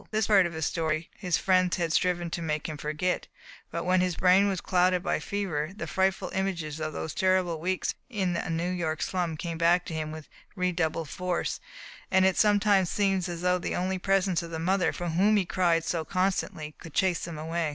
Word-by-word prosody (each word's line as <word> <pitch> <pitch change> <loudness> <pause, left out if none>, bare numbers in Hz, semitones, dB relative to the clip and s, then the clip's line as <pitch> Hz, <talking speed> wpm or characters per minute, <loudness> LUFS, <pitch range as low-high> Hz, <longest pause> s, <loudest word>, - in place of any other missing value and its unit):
This 215 0 +1
part 195 -4 +5
of 170 - -8
his 160 -1 -2
story 160 0 -1
his 180 -4 0
friends 185 -1 +2
had 170 -3 -1
striven 175 -2 +1
to 170 - -3
make 155 -2 -2
him 155 - -5
forget, 155 +5 -2 0.4
but 170 - -3
when 185 0 +3
his 180 -2 0
brain 185 +3 +4
was 190 -2 -1
clouded 180 0 +2
by - - 0
fever, 185 -5 -3
the 220 - -5
frightful 190 -1 0
images 170 -6 -2
of 155 0 -2
those 155 +1 -5
terrible 185 -3 +1
weeks 185 +3 -1 0.2
in 190 -7 -1
a 175 - -3
New 170 +2 -1
York 160 -3 -2
slum 175 -4 -2
came 165 0 -4
back 175 +1 +3
to - - -6
him 155 -1 -3
with 155 -1 -8 0.3
redoubled 170 -4 -1
force, 180 -1 -2 0.5
and 190 0 +4
it 190 -1 +3
sometiipes 205 -2 +4
seemed 190 0 0
as 170 -1 -5
though 180 0 +2
only 185 +1 -1
the - - -9
presence 195 -2 +1
of 170 - -7
the 165 - -4
mother 185 +3 +1
for 175 -1 -4
whom 200 +6 +3
he 195 - +1
cried 170 -2 +2
so 165 -2 -1
constantly 185 -3 -1
could 165 -3 -11
chase 185 -3 +2
them 170 -2 -5
away. 160 +1 -2
180 Hz, 210 wpm, -28 LUFS, 165-190 Hz, 0.5 s, part